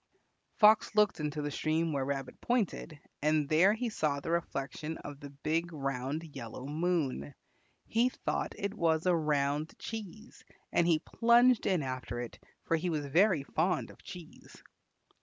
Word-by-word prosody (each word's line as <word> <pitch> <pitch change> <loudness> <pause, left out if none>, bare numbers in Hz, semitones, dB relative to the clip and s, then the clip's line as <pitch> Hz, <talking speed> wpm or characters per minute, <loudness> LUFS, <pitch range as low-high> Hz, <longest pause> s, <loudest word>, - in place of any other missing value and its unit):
Fox 215 0 +5
looked 210 -4 +3
into 150 0 -2
the 145 - -2
stream 160 +2 0
where 140 -2 0
Rabbit 135 -1 -4
pointed, 205 -9 -1 0.2
and 150 0 +2
there 180 +6 +5
he 245 +2 -2
saw 150 -9 0
the 165 - -4
reflection 155 -1 -3
of 145 -1 -9
the 145 - -9
big 160 +5 -2
round 140 0 -3
yellow 125 0 -7
moon. 150 - -1 0.5
He 235 +3 +2
thought - - -3
it 200 0 -2
was 165 -5 +1
a 180 -1 +4
round 150 -1 0
cheese, 220 +1 -8 0.3
and 170 - +3
he 165 -2 +5
plunged 235 +7 +4
in 180 -6 +2
after 130 -2 -4
it, 120 -1 -6 0.3
for 165 - +2
he 180 +3 -2
was 150 -3 -1
very 170 +2 +3
fond 170 +6 0
of - - -18
cheese. 175 -3 -12
160 Hz, 160 wpm, -31 LUFS, 140-185 Hz, 0.5 s, Fox